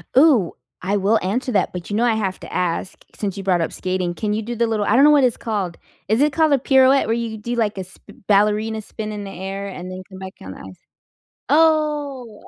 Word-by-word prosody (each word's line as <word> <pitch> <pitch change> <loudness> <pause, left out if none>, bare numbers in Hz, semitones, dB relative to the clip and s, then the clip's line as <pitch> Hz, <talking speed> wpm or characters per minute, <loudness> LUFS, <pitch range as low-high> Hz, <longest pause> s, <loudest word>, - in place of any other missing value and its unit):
Ooh, 260 - +5 0.3
I 195 +3 0
will 205 +3 +2
answer 245 +7 -1
that, 195 - +1
but 180 -2 -7
you 205 - -2
know 225 - +2
I 235 - +3
have 195 -4 -2
to - - -10
ask, 180 +1 -2
since 200 -3 -3
you 195 - -5
brought 185 -3 +2
up 165 - -2
skating, 185 -1 -2
can 210 +3 -2
you 215 - -1
do 240 +2 -5
the 235 0 +1
little 215 -2 -1
I 210 - +2
don't 270 - +6
know 295 - +7
what 290 -2 +5
it's 245 -3 +2
called, 200 -6 -3 0.3
is 220 +5 +2
it 300 +1 +3
called 315 -2 +3
a 275 - +3
pirouette 265 0 +4
where 225 - +1
you 235 -1 -3
could 220 -1 -8
do, 240 +2 -2
like, 215 -3 0
a 190 - -3
sp 185 - -16
ballerina 210 +2 +2
spin 215 0 -7
in 210 -1 -5
the 195 - -7
air 195 +1 -5
and 185 -2 -7
then 185 0 -7
come 190 -1 -12
back 190 0 -8
on 95 - -8
the - - -11
ice? 95 -1 -11 0.7
Oh. 295 -6 +1
210 Hz, 255 wpm, -21 LUFS, 190-245 Hz, 0.7 s, know